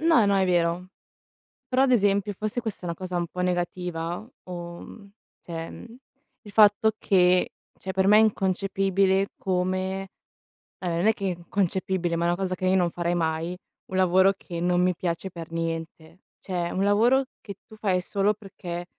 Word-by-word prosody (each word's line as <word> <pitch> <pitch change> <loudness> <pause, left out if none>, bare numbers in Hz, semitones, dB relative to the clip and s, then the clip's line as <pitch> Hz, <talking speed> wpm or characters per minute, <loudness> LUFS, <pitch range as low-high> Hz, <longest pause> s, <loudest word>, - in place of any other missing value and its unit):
no 320 -8 +5
no, 200 0 +3
è 190 - +3
vero. 175 0 +1 0.8
Però, 260 +1 +3
ad 270 - +3
esempio, 205 -3 +2
forse 215 +4 -3
questa 220 -3 -5
è - - -7
una 170 -1 -3
cosa 185 0 -4
un 175 -1 -1
po' 180 +2 -5
negativa 175 +1 -2 0.2
o, 175 -1 -7
mhmm, 200 -3 -12 0.3
cioè, 165 -1 -6
mhmm, 235 0 -11 0.5
il 205 - -12
fatto 210 +1 +5
che 180 -3 +3 0.3
cioè 190 - -4
per 190 +1 +1
me 210 +1 +7
è - - +7
inconcepibile 195 -1 +1
come 185 +1 -1 0.7
ehm, 180 - -3
non 175 +5 +1
è 220 - +6
che 195 - -7
è - - +1
inconcepibile, 180 -1 -1
ma 170 - -1
è - - +3
una 175 - +1
cosa 185 0 -2
che 185 0 -3
io 185 +1 +4
non 175 -2 +2
farei 175 0 -1
mai, 165 +1 -1 0.3
un 190 - -5
lavoro 190 +1 +4
che 170 -3 -7
non 175 0 +2
mi 180 0 +2
piace 175 +2 -3
per 165 -2 -9
niente. 165 0 -5 0.2
Cioè, 175 -2 -3
un 190 - 0
lavoro 235 +7 +4 0.2
che 200 - -8
tu 220 - -14
fai 195 -4 +1
solo 200 +3 +1
perché 180 -4 -7
185 Hz, 185 wpm, -26 LUFS, 175-200 Hz, 0.8 s, me